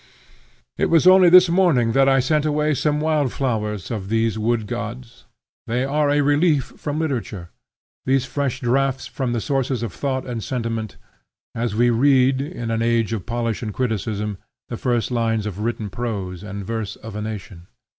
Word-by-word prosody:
It - - +2
was 165 0 +4
only 185 -1 +7
this 180 +1 +8
morning 170 -10 +3
that 135 +3 +4
I 135 0 +4
sent 150 +3 +1
away 150 0 +1
some 150 +1 0
wild 150 -4 +1
flowers 105 -7 -2
of 100 -4 -4
these 115 0 +1
wood 110 0 0
gods. 115 +4 -7 0.4
They 125 +3 0
are 145 +1 +1
a 145 0 +3
relief 145 0 +2
from 150 0 -4
literature, 120 - -3 0.6
these 135 0 +2
fresh 140 -1 -2
draughts 130 +1 0
from 120 +1 -3
the 120 - 0
sources 135 -2 -1
of 110 -6 -4
thought 130 -2 -2
and 120 -4 -4
sentiment; 115 -4 -3 0.6
as 115 -2 -2
we 120 +2 +3
read, 130 +1 +3
in 140 -6 -5
an 115 0 0
age 115 -1 +1
of 105 -5 -5
polish 115 -2 -2
and 110 -4 -5
criticism, 105 -4 -2 0.3
the 120 - -4
first 120 -1 -1
lines 115 -3 0
of 105 -2 -5
written 110 -1 -2
prose 100 -5 -4
and 100 -1 -7
verse 110 -2 -4
of 110 -1 -10
a 105 - -3
nation. 100 -5 -7
120 Hz, 175 wpm, -21 LUFS, 110-140 Hz, 0.6 s, this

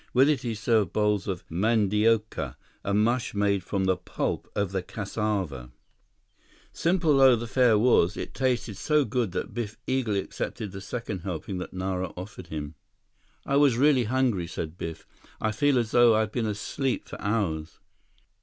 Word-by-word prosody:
With 135 +3 +6
it 145 -5 +1
he 115 -2 -3
served 105 -3 +1
bowls 105 -2 +1
of 95 -3 -4
mandioca, 105 +3 +1 0.3
a 100 - -2
mush 115 +3 +1
made 100 -2 +1
from 95 +1 -1
the 95 -1 +2
pulp 90 - -4
of 100 -3 0
the 95 -1 -1
cassava. 95 - -3 1.0
Simple 165 -4 +2
though 135 -2 +7
the 120 0 -4
fare 115 0 +4
was, 105 -5 +3
it - - -5
tasted 125 -6 -1
so 150 +3 +2
good 115 -3 -1
that - - -3
Biff 110 -3 -4
eagerly 125 -6 0
accepted 100 +1 -5
the 100 0 -8
second 105 -1 -4
helping 90 +1 -4
that 90 - -6
Nara 95 0 -2
offered 95 -1 -8
him. 75 -2 -5 0.7
"I 140 - +1
was 140 -5 +4
really 135 -2 +4
hungry," 115 -7 +1
said 80 -1 -5
Biff. 80 -2 -6 0.3
"I 110 - 0
feel 140 +5 +2
as 115 -2 0
though 120 -2 +6
I 110 - +3
had 110 -1 -2
been 115 -2 -1
asleep 115 +5 -2
for - - -9
hours." 95 -7 -2
105 Hz, 170 wpm, -27 LUFS, 95-120 Hz, 1.0 s, though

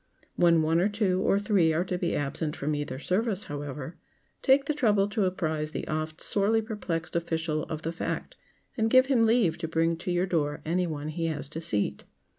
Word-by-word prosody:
When 170 -2 +4
one 165 +2 +2
or 190 +4 +3
two, 200 -3 +1
or 195 - +3
three, 200 -6 +3
are 165 +3 +1
to 180 - -2
be 180 -1 -1
absent 150 +2 -2
from 150 +2 -2
either 145 -3 -3
service, 200 - 0
however, 145 +1 -6 0.4
take 275 0 +4
the 300 - 0
trouble 210 -8 +2
to 205 -1 0
apprise 155 -4 -2
the - - -4
oft 155 +1 -3
sorely 210 +2 +2
perplexed 185 -7 -4
official 160 -2 -1
of 155 -1 -6
the 165 - -1
fact, 170 - -4 0.4
and 225 -3 +1
give 255 +2 +6
him 260 -3 +2
leave 220 -8 +3
to 165 - -3
bring 165 +1 +1
to 175 - -6
your 175 +1 +1
door 150 -5 -1
any 175 +3 +1
one 150 -1 -4
he 165 +1 -2
has 155 -3 -3
to 160 +2 -6
seat. 105 -11 -2
170 Hz, 205 wpm, -28 LUFS, 155-205 Hz, 0.4 s, give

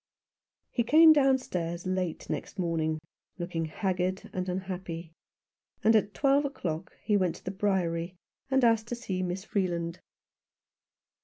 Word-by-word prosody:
He 240 - +1
came 315 +6 +8
downstairs 255 - +1
late 185 -3 -2
next - - -4
morning, 165 -3 0 0.4
looking 170 -2 -2
haggard 185 +2 -2
and 185 0 -2
unhappy, 180 -3 -4 0.7
and 225 +1 +5
at 210 -1 +2
twelve 280 +1 +3
o'clock 180 - -4
he 210 - +2
went 185 -4 +2
to - - -14
the 185 - -2
Briery 180 -3 0 0.3
and 265 -1 +3
asked 225 -1 +4
to 240 - -3
see 195 -6 -3
Miss 185 +1 -2
Free 200 -3 0
land. 170 0 -3
185 Hz, 140 wpm, -29 LUFS, 170-220 Hz, 0.7 s, came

